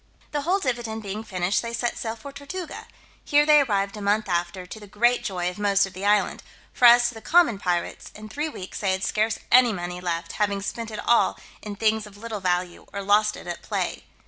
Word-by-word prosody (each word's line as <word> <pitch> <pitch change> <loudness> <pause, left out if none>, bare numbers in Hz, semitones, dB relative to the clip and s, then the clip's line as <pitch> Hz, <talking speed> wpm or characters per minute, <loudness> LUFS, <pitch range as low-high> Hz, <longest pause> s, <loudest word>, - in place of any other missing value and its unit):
The 295 - -1
whole 355 +7 +2
dividend 235 - -3
being 205 +2 -5
finished, 185 -2 0
they 235 0 -5
set 240 0 -1
sail 225 -1 -4
for 255 +5 -10
Tortuga: 290 +6 -7 0.4
here 295 0 +4
they 300 -1 +7
arrived 200 -6 0
a 210 - -7
month 205 +1 +1
after, 175 +1 -2
to 210 +4 -9
the 205 - -12
great 240 +5 +2
joy 180 -2 -2
of 180 +3 -4
most 200 -1 +3
of 195 - -10
the 195 +2 -3
island; 205 0 +2 0.3
for 245 - +2
as 240 0 +8
to - - -9
the 225 - -10
common 320 - +3
pirates, 175 -3 -2
in 215 0 -9
three 295 +8 -3
weeks 190 -10 -8
they 195 -2 +1
had 190 0 -3
scarce 215 +2 0
any 245 -1 +7
money 175 -1 -5
left, 170 -1 -3
having 200 -1 -1
spent 230 +2 -4
it 215 - -6
all 235 - +3 0.2
in 210 -1 -6
things 220 0 +1
of 205 -1 -15
little 220 0 -5
value, 180 -1 -2
or 200 0 -5
lost 210 +2 +3
it - - -11
at 175 -1 -5
play. - - -3
210 Hz, 225 wpm, -25 LUFS, 195-235 Hz, 0.4 s, as